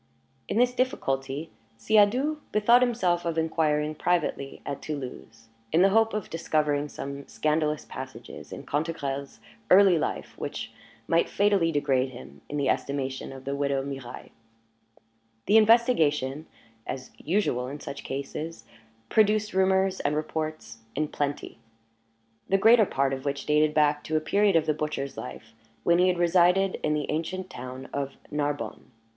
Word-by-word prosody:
In - - -2
this 245 +1 +4
difficulty, 145 - -2 0.3
Siadoux 220 - +3
bethought 235 +4 +5
himself 185 -9 +1
of 165 -1 -2
inquiring 155 -2 +1
privately 155 -4 -1
at 140 -1 -4
Toulouse, 125 -6 -7 0.2
in 165 +3 +5
the 195 - +6
hope 225 +1 +3
of 215 - -3
discovering 150 -3 0
some 140 0 -7
scandalous 155 -1 0
passages - - -9
in - - -8
Cantegrel's 140 -3 -3 0.3
early 190 -3 +7
life - - -3
which - - -5 0.4
might 165 0 +2
fatally 200 -5 +2
degrade 135 -3 +1
him 70 - -12
in 145 - -3
the 140 -2 0
estimation 135 -1 -2
of 135 -1 -11
the 140 +1 -2
widow 140 -1 0
Mirailhe. 135 -3 -8 1.1
The 215 - +5
investigation, 160 - +3 0.4
as 130 -1 -6
usual 155 -9 0
in 145 +3 -6
such 140 - -7
cases, 145 +4 -5 0.4
produced 215 - +2
rumors 190 0 +2
and 150 - 0
reports 155 -6 -4 0.2
in 150 +1 -1
plenty, 145 -5 -3 0.9
the 195 - +4
greater 220 +1 +6
part 135 0 0
of 135 0 -4
which 140 -1 -3
dated 150 0 +2
back 150 -1 +3
to 155 - 0
a - - +3
period 200 +4 +2
of 165 - +3
the 155 - +2
butcher's 150 -2 -3
life 110 0 -9 0.3
when 170 0 +4
he 180 - +5
had 180 -1 +2
resided 180 +2 +3
in 150 - +1
the 150 - -1
ancient 185 +4 -3
town 130 +1 -8
of 140 -1 -3
Narbonne. 145 -1 -3
155 Hz, 150 wpm, -27 LUFS, 140-185 Hz, 1.1 s, early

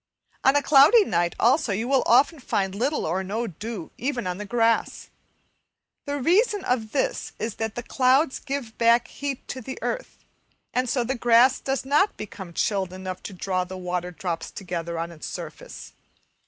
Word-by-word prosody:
On 270 +1 +5
a 290 - +3
cloudy 300 - +7
night 175 -2 0
also 245 0 +3
you 220 +5 -1
will 270 0 +3
often 280 +6 +4
find 195 -6 -1
little 260 +9 -1
or 185 +4 -1
no 215 +5 -2
dew 210 -1 -7
even 255 -4 -2
on 180 +1 -3
the 210 - -6
grass. 230 0 0 1.0
The 285 0 -1
reason 395 - +2
of 225 -4 -1
this - - -1
is 220 0 -4
that 225 -1 -3
the 245 - -4
clouds 265 +4 +2
give 270 -5 -5
back 235 0 +4
heat 280 -2 -5
to 260 - -5
the 260 +3 -7
earth, - - -4 0.5
and 255 0 0
so 250 -1 +1
the 250 +3 -1
grass 240 +1 +4
does 270 0 -2
not 300 +9 +2
become 190 -4 -8
chilled 190 0 0
enough 185 0 -6
to - - -8
draw 185 0 -1
the 185 +1 -8
water 180 -1 -3
drops 175 -1 -4
together 170 -3 -5
on 165 +1 -3
its 160 -2 -8
surface. - - -8
230 Hz, 180 wpm, -25 LUFS, 190-270 Hz, 1.0 s, cloudy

